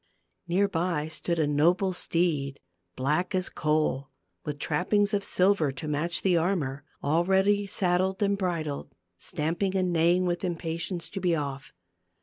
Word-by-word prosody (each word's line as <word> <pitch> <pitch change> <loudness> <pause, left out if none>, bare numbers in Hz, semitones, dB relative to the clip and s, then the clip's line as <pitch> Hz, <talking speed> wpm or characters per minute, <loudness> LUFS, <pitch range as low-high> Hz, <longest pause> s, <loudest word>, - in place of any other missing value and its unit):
Near 190 +4 +2
by 165 -4 -1
stood 170 +1 -2
a 155 - +2
noble 170 +6 +2
steed, 155 -6 -1 0.4
black 155 +8 0
as 185 0 0
coal, 150 -3 0 0.3
with 150 -1 -4
trappings 200 +8 +1
of 200 -1 +1
silver 185 -7 +3
to 135 +3 -6
match 155 +4 -1
the 185 -2 +3
armor, 160 -6 0 0.2
all 160 +4 +2
ready 195 +2 +2
saddled 190 +1 +1
and 200 0 +2
bridled, 165 -7 -3 0.2
stamping 175 - -1
and 185 -2 +1
neighing 170 +2 +3
with 175 0 -1
impatience 170 0 -2
to 195 - -5
be 175 -2 +2
off. 140 -3 -4
175 Hz, 145 wpm, -27 LUFS, 150-185 Hz, 0.4 s, silver